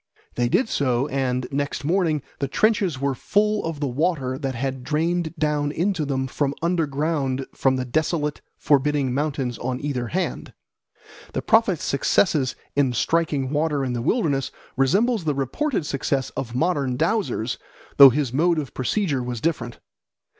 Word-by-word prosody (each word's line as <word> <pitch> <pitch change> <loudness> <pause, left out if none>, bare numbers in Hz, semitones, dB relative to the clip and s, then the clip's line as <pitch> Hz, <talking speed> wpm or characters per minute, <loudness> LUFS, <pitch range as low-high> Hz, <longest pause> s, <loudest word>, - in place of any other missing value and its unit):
They 120 0 0
did 235 - +2
so, 130 - +1
and 130 -2 -1
next 140 +1 -2
morning 160 -4 +1 0.2
the 140 - -1
trenches 195 - +1
were 140 0 0
full 210 +9 +1
of 165 -3 -4
the 145 - -1
water 135 -1 0
that 135 -2 -3
had 130 +1 -3
drained 165 +3 -1
down 150 -1 0
into 175 0 0
them 130 -1 -1 0.4
underground 150 -5 0
from 130 -1 +2
the 130 -1 -2
desolate, 150 +2 -1 0.2
forbidding 145 -2 +2
mountains 135 -4 -2
on 125 +1 -2
either 130 -4 -2
hand. 185 +9 -3 0.8
The - - -2
prophet's 220 -7 +3
success 140 -1 +2 0.2
in 135 -3 +2
striking 145 0 0
water 150 -2 0
in 125 - -2
the 120 - -2
wilderness 145 - +1 0.3
resembles 200 - +2
the 150 -2 +1
reported 160 - -1
success 135 -1 -1
of 120 -2 -5
modern 140 -4 0
dowsers, 165 - 0 0.4
though 140 -1 +11
his 130 -1 -1
mode 170 +4 +3
of 145 -4 -4
procedure 145 - 0
was 125 -1 -4
different. 120 -5 -2
145 Hz, 150 wpm, -23 LUFS, 130-165 Hz, 0.8 s, though